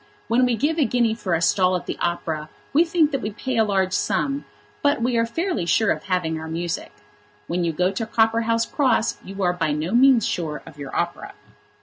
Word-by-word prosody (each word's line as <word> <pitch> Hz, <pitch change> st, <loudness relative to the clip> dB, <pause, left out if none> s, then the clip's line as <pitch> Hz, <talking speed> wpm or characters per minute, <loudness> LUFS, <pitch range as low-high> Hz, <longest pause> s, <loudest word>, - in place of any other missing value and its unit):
When 245 Hz, +2 st, +3 dB
we 245 Hz, -1 st, +1 dB
give 310 Hz, +8 st, 0 dB
a 290 Hz, -, +4 dB
guinea 235 Hz, -1 st, +2 dB
for 190 Hz, -6 st, -1 dB
a 165 Hz, -, -1 dB
stall 185 Hz, +1 st, +3 dB
at 180 Hz, -, -3 dB
the -, -, -3 dB
opera 160 Hz, -3 st, -2 dB, 0.2 s
we 310 Hz, +4 st, +6 dB
think 330 Hz, -3 st, +2 dB
that 275 Hz, -3 st, -1 dB
we 210 Hz, -, -2 dB
pay 245 Hz, +4 st, -4 dB
a 225 Hz, -, +5 dB
large 190 Hz, -3 st, 0 dB
sum; 280 Hz, +7 st, 0 dB, 0.4 s
but 285 Hz, -2 st, +2 dB
we 240 Hz, +1 st, 0 dB
are 230 Hz, 0 st, +2 dB
fairly 240 Hz, -, -2 dB
sure 220 Hz, +4 st, +3 dB
of -, -, -3 dB
having 180 Hz, -4 st, -1 dB
our 160 Hz, -, -7 dB
music. 165 Hz, +1 st, -4 dB, 0.5 s
When 175 Hz, +1 st, -1 dB
you 170 Hz, -, +1 dB
go 180 Hz, +4 st, +1 dB
to 220 Hz, +3 st, -3 dB
Copperhouse 230 Hz, +1 st, +2 dB
Cross 250 Hz, -4 st, +1 dB
you 195 Hz, +1 st, -5 dB
are 180 Hz, -1 st, +2 dB
by 165 Hz, -4 st, -1 dB
no 155 Hz, +4 st, -2 dB
means 245 Hz, -1 st, +5 dB
sure 155 Hz, -4 st, -3 dB
of 150 Hz, -, -13 dB
your 140 Hz, -1 st, -7 dB
opera. 170 Hz, 0 st, -3 dB
210 Hz, 220 wpm, -23 LUFS, 175-245 Hz, 0.5 s, we